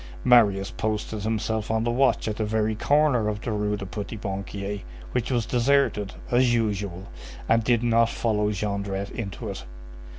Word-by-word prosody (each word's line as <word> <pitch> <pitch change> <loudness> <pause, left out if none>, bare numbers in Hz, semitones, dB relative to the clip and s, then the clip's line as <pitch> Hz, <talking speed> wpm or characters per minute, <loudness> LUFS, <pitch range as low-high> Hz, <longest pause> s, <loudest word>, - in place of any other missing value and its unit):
Marius 105 -4 +4
posted 110 -1 -3
himself 110 0 -1
on 110 0 +1
the 120 - +1
watch 130 0 +2
at 105 -1 -2
the 110 - 0
very 110 0 0
corner 140 -1 +2
of 105 -1 -2
the 120 - -3
Rue 105 0 0
du 100 - -6
Petit 100 +4 -6
Banquier, 100 0 -4 0.3
which 125 -2 -1
was 120 -4 +1
deserted, 125 -5 +1 0.2
as 120 0 +4
usual, 100 -5 -1 0.4
and 115 0 +3
did 120 +1 +2
not 115 -1 +3
follow 105 -3 0
Jondrette 100 -1 -3
into 100 -5 -5
it. - - -5
110 Hz, 165 wpm, -25 LUFS, 100-115 Hz, 0.4 s, Marius